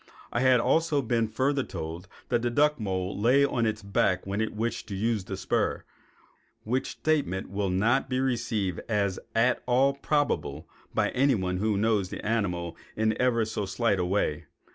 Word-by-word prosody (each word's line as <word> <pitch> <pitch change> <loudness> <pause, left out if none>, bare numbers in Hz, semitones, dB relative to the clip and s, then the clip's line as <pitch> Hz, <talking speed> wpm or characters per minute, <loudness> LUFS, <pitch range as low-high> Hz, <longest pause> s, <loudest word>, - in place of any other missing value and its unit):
I 120 - +1
had 130 -1 +5
also 155 +2 +2
been 115 -1 +1
further 135 +5 0
told 85 -5 -6 0.2
that 120 -1 +2
the 120 - 0
duck 150 +4 +2
mole 95 -2 -2
lay 125 +7 +4
on 120 -4 0
its 110 -1 -3
back 95 -2 +1
when 100 +2 -2
it 110 - -2
wished 115 +2 -2
to 100 - -5
use 105 -1 0
the - - -5
spur, - - 0 0.8
which 125 +4 -1
statement 140 -14 -1
will 100 -1 -1
not 115 +9 +2
be 130 -1 0
received 110 -8 -1
as 100 -4 0 0.2
at 120 +2 +3
all 130 +3 +4
probable 140 - -1 0.2
by - - +1
anyone 110 -9 +1
who 105 +1 0
knows 105 -3 +1
the - - -7
animal 90 -6 -1 0.2
in 110 0 +1
ever 120 -3 +2
so 105 -2 -3
slight 100 +1 +1
a 90 - +1
way. 90 -5 0
110 Hz, 175 wpm, -27 LUFS, 95-125 Hz, 0.8 s, had